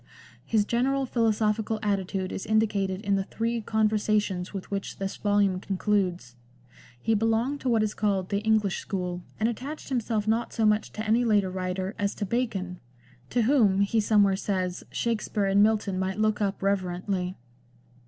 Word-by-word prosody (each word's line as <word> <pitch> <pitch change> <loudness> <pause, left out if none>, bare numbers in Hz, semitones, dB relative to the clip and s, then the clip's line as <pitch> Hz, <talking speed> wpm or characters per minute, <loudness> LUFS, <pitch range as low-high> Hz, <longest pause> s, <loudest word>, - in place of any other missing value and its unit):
His 215 -2 +1
general 265 +4 +1
philosophical 220 -2 +1
attitude 195 -2 -1
is - - -5
indi 220 0 +4
cated 195 -2 -2
in 200 -1 +1
the 195 - 0
three 230 +3 -2
Conversations 215 -4 0
with 195 -1 -7
which 195 -1 -4
this 195 0 -3
volume 205 -2 +2
concludes. 185 - -1 0.6
He 225 - +1
belonged 225 +6 +1
to 260 - -1
what 225 -2 +3
is 215 - -1
called 195 -3 0
the 200 - 0
English 215 -3 +1
school, 180 -2 -3 0.2
and 220 - +2
attached 265 +8 -5
himself 225 -4 -1
not 225 +2 0
so 225 - +1
much 210 0 +2
to 215 - -4
any 230 +3 +3
later 205 -5 +2
writer 185 +1 -3
as 200 0 0
to 205 - -3
Bacon, 195 -5 -2 0.5
to 240 -1 +1
whom, 215 -6 +4
he 200 +3 +2
somewhere 205 -2 +4
says, 185 -2 -2
Shakspere 215 -3 -1
and 195 +1 +4
Milton 210 -3 +2
might 190 +1 -2
look 215 0 +1
up 195 -1 -1
reverently. 185 -1 -1
205 Hz, 165 wpm, -27 LUFS, 190-220 Hz, 0.6 s, indi